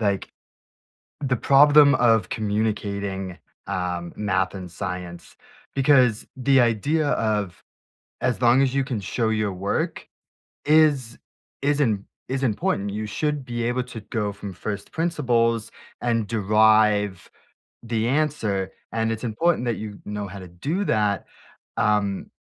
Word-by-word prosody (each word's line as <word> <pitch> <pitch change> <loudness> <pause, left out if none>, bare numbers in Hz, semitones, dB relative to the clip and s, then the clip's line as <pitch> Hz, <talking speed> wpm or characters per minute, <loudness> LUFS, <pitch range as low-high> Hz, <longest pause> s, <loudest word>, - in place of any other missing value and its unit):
like, 100 -3 -1 0.9
the 130 -2 +1
problem 145 +3 +6
of 115 -6 +3
communicating, 100 -3 -2 0.3
um, 90 -3 -3
math 95 -2 0
and 90 -2 -7
science, 90 -2 -6 0.4
because 130 -5 +4
the 135 +1 +3
idea 145 +7 +1
of 105 -6 -1 0.6
as 125 -1 0
long 120 +2 +5
as 135 -1 +1
you 135 - +2
can 125 -5 -3
show 110 +4 -1
your 110 -3 0
work 95 +2 -2 0.6
is 145 -6 +3 0.4
is 145 +1 +1
im 105 -8 +1 0.2
is 135 +1 -2
important. 105 -3 0
You 105 +2 -4
should 145 +5 -2
be 120 -1 -3
able 125 +2 0
to 125 -3 -9
go 105 -1 -3
from 100 -1 -8
1st 100 +3 -6
principles 120 -9 0 0.3
and 115 -3 0
derive 105 -3 +3 0.5
the 115 -1 -1
answer, 125 -9 0 0.2
and 115 0 0
it's 115 +2 -4
important 125 +4 +1
that 120 - 0
you 105 -2 -7
know 105 -1 -4
how 100 +1 -9
to 95 - -9
do 150 - -3
that. 105 -3 +1 0.5
Um, 105 -2 +1
110 Hz, 135 wpm, -24 LUFS, 100-130 Hz, 0.9 s, problem